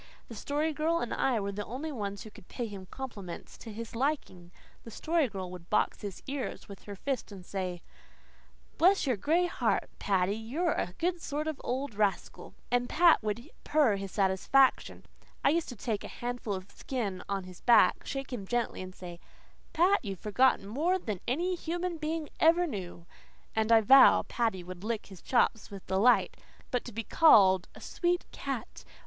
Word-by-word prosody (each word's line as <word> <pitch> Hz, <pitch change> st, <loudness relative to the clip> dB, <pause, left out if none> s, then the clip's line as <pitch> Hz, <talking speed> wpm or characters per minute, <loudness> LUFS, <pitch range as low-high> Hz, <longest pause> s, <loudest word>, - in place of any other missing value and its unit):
The 230 Hz, -, -8 dB
Story 295 Hz, +7 st, -1 dB
Girl 315 Hz, +3 st, +1 dB
and 240 Hz, -, -2 dB
I 255 Hz, -4 st, +1 dB
were 200 Hz, 0 st, -3 dB
the 205 Hz, +1 st, -4 dB
only 270 Hz, +9 st, -5 dB
ones 200 Hz, -6 st, -4 dB
who 215 Hz, -, -11 dB
could 180 Hz, -, -16 dB
pay 245 Hz, -, -4 dB
him 200 Hz, -4 st, -8 dB
compliments 200 Hz, -8 st, -8 dB
to 225 Hz, -, -9 dB
his 230 Hz, +2 st, -7 dB
liking. 230 Hz, -, -2 dB, 0.3 s
The -, -, -10 dB
Story 315 Hz, +5 st, 0 dB
Girl 190 Hz, -5 st, -6 dB
would 180 Hz, -1 st, -11 dB
box -, -, +1 dB
his 200 Hz, -4 st, -7 dB
ears 275 Hz, -1 st, -5 dB
with 200 Hz, -2 st, -12 dB
her 205 Hz, -, -7 dB
fist 260 Hz, +2 st, -3 dB
and 190 Hz, -3 st, -10 dB
say, 185 Hz, -3 st, -4 dB, 1.0 s
"Bless 375 Hz, +2 st, +5 dB
your 255 Hz, -3 st, +1 dB
gray 320 Hz, -, +2 dB
heart, 350 Hz, -, -1 dB
Paddy, 195 Hz, 0 st, +1 dB
you're 270 Hz, +11 st, -1 dB
a 180 Hz, -8 st, -2 dB
good 350 Hz, 0 st, -1 dB
sort 300 Hz, 0 st, -3 dB
of 310 Hz, -3 st, -4 dB
old 260 Hz, 0 st, -2 dB
rascal," 205 Hz, -1 st, -2 dB, 0.2 s
and 245 Hz, 0 st, +1 dB
Pat 340 Hz, 0 st, +5 dB
would 220 Hz, +5 st, -3 dB, 0.2 s
purr 290 Hz, -9 st, +3 dB
his 195 Hz, -1 st, -6 dB
satisfaction; 200 Hz, +7 st, +2 dB, 0.4 s
I -, -, +7 dB
used 330 Hz, +3 st, 0 dB
to 245 Hz, -, -7 dB
take 215 Hz, -1 st, -3 dB
a -, -, -6 dB
handful 240 Hz, -4 st, -4 dB
of 185 Hz, +1 st, -8 dB
the -, -, -22 dB
skin 215 Hz, -8 st, -3 dB
on 195 Hz, -1 st, -1 dB
his 180 Hz, -1 st, -12 dB
back, 235 Hz, -3 st, +5 dB
shake 270 Hz, -1 st, -5 dB
him 200 Hz, -6 st, -5 dB
gently 240 Hz, -3 st, -1 dB
and 185 Hz, 0 st, -8 dB
say, 175 Hz, -2 st, -9 dB, 0.5 s
"Pat, 360 Hz, +3 st, +3 dB
you've 195 Hz, -3 st, -5 dB
forgotten 210 Hz, 0 st, +2 dB
more 315 Hz, -, +1 dB
than 215 Hz, -, -4 dB
any 345 Hz, +9 st, 0 dB
human 345 Hz, 0 st, -3 dB
being 310 Hz, 0 st, -3 dB
ever 335 Hz, +2 st, +5 dB
knew," 180 Hz, -, -6 dB, 0.5 s
and 220 Hz, +1 st, +1 dB
I 225 Hz, -1 st, +7 dB
vow 265 Hz, +5 st, +7 dB
Paddy 225 Hz, -7 st, -1 dB
would 180 Hz, +1 st, -9 dB
lick 225 Hz, 0 st, -2 dB
his 190 Hz, -3 st, -13 dB
chops 240 Hz, -3 st, +1 dB
with 200 Hz, -2 st, -10 dB
delight. 205 Hz, +7 st, +3 dB, 0.3 s
But 250 Hz, -2 st, 0 dB
to 240 Hz, -, -7 dB
be 230 Hz, +1 st, -4 dB
called 190 Hz, -, +5 dB
"a -, -, -12 dB
sweet 355 Hz, 0 st, -1 dB
cat!" -, -, -5 dB
230 Hz, 190 wpm, -30 LUFS, 195-295 Hz, 1.0 s, I